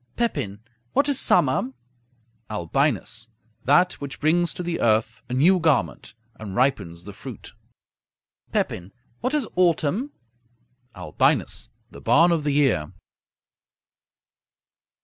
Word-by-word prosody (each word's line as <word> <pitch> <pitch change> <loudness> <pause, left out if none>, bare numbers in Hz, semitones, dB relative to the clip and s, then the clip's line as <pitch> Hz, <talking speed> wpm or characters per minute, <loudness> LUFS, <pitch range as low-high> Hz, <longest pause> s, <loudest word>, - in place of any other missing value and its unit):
Pepin 135 - -2 0.3
What 280 - +3
is 280 -2 +3
summer? 130 -5 +2 0.8
Albinus 105 +3 -1 0.4
That 175 +8 +4
which 140 -1 -6
brings 170 +3 +2
to 180 - -4
the 170 -1 -2
earth 110 -1 +1
a - - -4
new 180 +8 +5
garment, 155 -9 0 0.2
and 100 -3 -7
ripens 100 -10 0
the 100 +2 -9
fruit. - - -10 1.0
Pepin 90 +2 -2 0.3
What 255 +4 -1
is 280 -7 0
autumn? 180 - +1 0.8
Albinus 110 - 0 0.2
The - - -12
barn 160 +10 +5
of 165 -3 +1
the 145 - 0
year. 130 - +2
140 Hz, 110 wpm, -24 LUFS, 110-175 Hz, 1.0 s, new